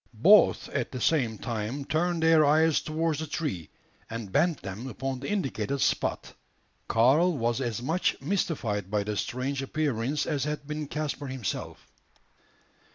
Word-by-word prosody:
Both 210 +3 +6
at 130 -4 -2
the 130 - -5
same 120 -6 +1
time 120 +4 -4
turned 170 +2 0
their 160 -1 +6
eyes 155 +2 +4
towards 160 0 -1
the 160 - -4
tree, 140 - -3 0.4
and 115 -4 -6
bent 165 - +1
them 100 +6 -6
upon 130 +2 -4
the 140 - -5
indicated 140 - -1
spot. - - 0 0.5
Karl 145 +9 +4
was 120 +1 0
as 120 -2 -3
much 165 +7 0
mystified 115 - -1
by 105 0 0
the 105 +1 -3
strange 130 +5 -2
appearance 140 -1 -1
as 145 -3 -1
had 150 -1 -3
been 150 0 -4
Caspar 145 -1 -3
himself. 130 -5 -5
140 Hz, 150 wpm, -28 LUFS, 115-155 Hz, 0.5 s, Both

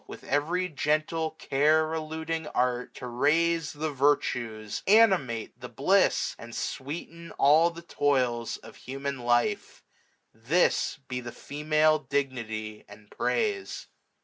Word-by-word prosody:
With - - -10
every 165 +6 0
gentle 155 +1 0
care 155 +3 +2
eluding 160 0 -3
art, 125 -3 -1
605 - - -10
To 125 - -5
raise 155 +6 +1
the 155 +1 -3
virtues, 120 -6 0
animate 190 - +3
the - - -7
bliss. - - +2
And 115 0 -9
sweeten 165 +4 -5
all 155 +5 +5
the 170 0 -11
toils 130 -7 0
of - - -14
human 135 +1 -5
life: 120 - 0 0.5
This 130 +11 +1
be 125 -1 -3
the 120 -1 -7
female 155 +3 +1
dignity, 115 -7 -3
and 105 0 -15
praise. 415 -4 -2
145 Hz, 120 wpm, -28 LUFS, 125-160 Hz, 0.5 s, all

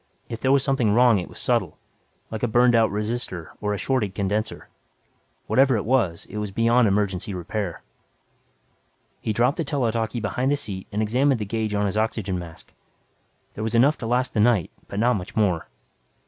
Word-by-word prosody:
If 115 -1 -6
there 130 - +2
was 140 -1 +4
something 135 -5 +1
wrong 115 0 +5
it 90 - -6
was - - -13
subtle, - - 0 0.5
like 110 - -4
a 120 - +1
burned 120 +2 +4
out 115 -2 +4
resistor 105 -4 -4
or 105 -1 -1
a 105 - -1
shorted 105 -6 -1
condenser. 105 +3 -2 0.8
Whatever 130 -2 +3
it 100 - -3
was, 110 -9 +1
it 105 - -8
was 105 -1 -2
beyond 115 +3 +3
emergency 100 0 -1
repair. 90 +1 -4 1.4
He - - -2
dropped 120 +5 +2
the 165 - 0
tele 135 -5 0
talkie 115 +1 -2
behind 125 +5 -1
the 145 - +2
seat 95 -8 -6
and 105 +1 0
examined 130 +4 +2
the 105 - -2
gauge 110 0 -2
on 105 0 +1
his 100 +1 -1
oxygen 105 -4 -1
tank. 85 -2 -11 0.8
There 110 - -5
was 110 +1 -1
enough 135 +5 +4
to 115 - -4
last 125 +2 0
the - - 0
night 105 -6 +3 0.2
but 100 - -7
not 120 0 +3
much 100 +5 -8
more. 95 -7 +1
110 Hz, 190 wpm, -24 LUFS, 100-120 Hz, 1.4 s, wrong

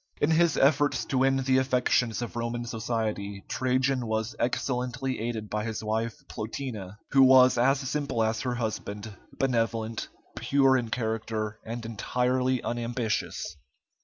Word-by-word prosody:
In 145 - +2
his 165 0 +3
efforts 145 +1 +3
to 130 - 0
win 135 0 +3
the 130 0 +3
affections 125 -2 +1
of 120 - -6
Roman 120 0 -2
society, 110 -4 -3
Trajan 130 -1 0
was 110 +1 -2
excellently 125 +1 -1
aided 110 -1 -3
by 105 0 -2
his 110 -1 -4
wife 110 +2 -2
Plotina, 110 -4 -5
who 135 - +6
was 130 -1 +7
as 135 +3 +3
simple 135 -3 -1
as 110 0 0
her 125 -2 -1
husband, 110 -2 -4 0.2
benevolent, 115 -3 0 0.3
pure 135 +2 +3
in 120 -3 0
character, 110 -2 -2
and 115 +1 -6
entirely 125 +3 0
unambitious. 120 -1 -2
120 Hz, 135 wpm, -28 LUFS, 110-130 Hz, 0.3 s, was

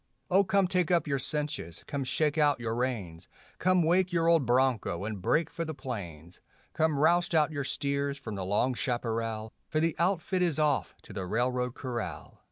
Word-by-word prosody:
Oh, 195 +2 +5
come 195 0 +2
take 180 -2 +1
up 170 -3 +3
your 140 -3 -1
cinches, 145 - -2
come 140 -1 -3
shake 150 +3 +1
out 145 -3 +3
your 115 -1 -2
reins; 105 -9 -3 0.3
Come 185 -1 +3
wake 180 +3 +2
your 165 -1 +1
old 165 -7 +4
broncho 120 -7 +1
and 105 -3 -5
break 155 - +2
for 165 - -3
the 160 -2 -5
plains; 90 - -7 0.3
Come 160 -2 +1
roust 170 +3 +3
out 155 0 +3
your 145 -2 -3
steers 140 +1 -2
from 120 -6 -7
the 100 -2 -4
long 105 +7 +1
chaparral, 115 -3 -2 0.2
For 155 - 0
the 165 0 +1
outfit 185 +1 +1
is 170 -5 +1
off 150 -3 +1
to - - -12
the 95 -3 -4
railroad 125 +3 0
corral. 120 - -5
140 Hz, 185 wpm, -29 LUFS, 115-160 Hz, 0.3 s, Oh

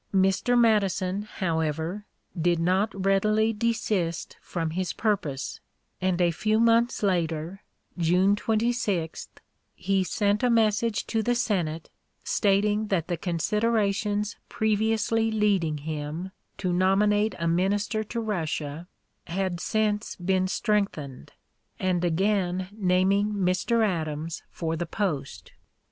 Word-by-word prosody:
Mr. 195 +6 +3
Madison, 200 -4 +2
however, 165 -1 -2 0.3
did 175 0 +2
not 185 +6 +1
readily 215 +3 +3
desist 210 -7 -1
from 165 -2 -3
his 185 +2 -2
purpose, 160 - -2 0.4
and 185 -1 +1
a 175 -1 +3
few 215 +6 +1
months 230 0 +3
later, 170 -1 -1 0.3
June 180 +4 +3
26, 215 -6 -1 0.5
he 195 +1 +1
sent 205 +3 0
a 250 - +3
message 225 -1 +2
to 225 - 0
the 245 +3 +1
Senate, 170 -9 -1 0.3
stating 210 +1 +2
that 180 -4 -1
the 175 - +1
considerations 205 +4 0
previously 220 +1 +1
leading 200 -8 +1
him 155 +4 -5 0.3
to 180 -3 -1
nominate 205 +4 +2
a 170 - -1
minister 200 +5 +1
to 230 +2 -5
Russia 160 -6 -3 0.4
had 185 0 -2
since 215 +2 -1
been 185 +1 0
strengthened, 185 - -2 0.5
and 180 -2 0
again 185 +1 0
naming 200 +1 +2
Mr. 200 +4 +1
Adams 160 -3 -3
for 165 -1 -3
the 170 +1 -3
post. 160 -9 -3
195 Hz, 115 wpm, -26 LUFS, 170-215 Hz, 0.5 s, Mr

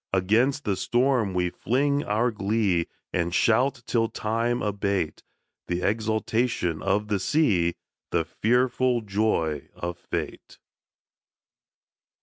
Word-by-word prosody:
Against 115 +10 +2
the 100 - +1
storm 120 -4 +1
we 90 -1 +1
fling 140 +7 0
our 110 +4 +1
glee 100 -4 0 0.3
And 85 0 0
shout, 125 +2 +2
till 115 -2 +1
Time 115 +3 -1
abate 100 -5 -1 0.5
The 90 0 -2
exultation 110 -4 0
of 105 +1 0
the 105 -2 0
sea, 95 - +2 0.3
The 85 -2 0
fearful 125 +5 +1
joy 95 -8 -1
of 85 0 -5
Fate. - - -5
110 Hz, 110 wpm, -26 LUFS, 95-120 Hz, 0.5 s, Against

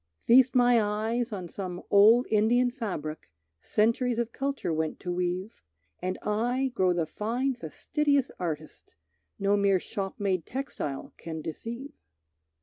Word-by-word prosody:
Feast 255 +2 +6
my 245 -2 +5
eyes 220 +3 -1
on 185 -4 -5
some 180 0 -6
old 220 +5 +7
Indian 240 +4 +3
fabric, 170 - -5 0.3
Centuries 230 - +1
of 235 -1 -1
culture 275 -10 -2
went 160 0 -2
to 180 - -3
weave, 180 +4 -3 0.4
And 185 0 -2
I 245 +5 0
grow 185 -5 +2
the 175 -2 0
fine 240 - -1
fastidious 280 - 0
artist, 155 - -5 0.4
No 200 +1 +2
mere 200 -2 +3
shop 195 +1 -5
made 190 -4 0
textile 240 - -5
can 160 -1 -6
deceive. 235 - -6
210 Hz, 135 wpm, -28 LUFS, 180-245 Hz, 0.4 s, old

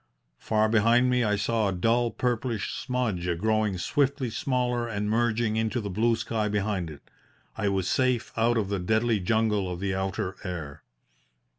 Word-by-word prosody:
Far 110 0 +1
behind 115 +3 +4
me 125 -1 +2
I 105 -2 +2
saw 105 +2 0
a - - 0
dull, 115 +6 +2
purplish 120 -3 -2
smudge 115 -9 -2
growing 110 0 +1
swiftly 140 - 0
smaller 125 -1 -1
and 105 -2 -2
merging 110 0 +1
into 110 +2 0
the 100 -3 -4
blue 115 +5 +2
sky 110 -1 -2
behind 100 -4 -1
it. 75 -2 -11 0.5
I 105 -2 0
was 95 -2 0
safe 130 -3 +1
out 115 +1 +2
of 105 -3 -1
the 100 -1 -1
deadly 110 +4 +1
jungle 105 -1 +1
of 90 - -5
the 100 0 -1
outer 95 0 -2
air. 85 -7 -6
110 Hz, 165 wpm, -27 LUFS, 100-120 Hz, 0.5 s, behind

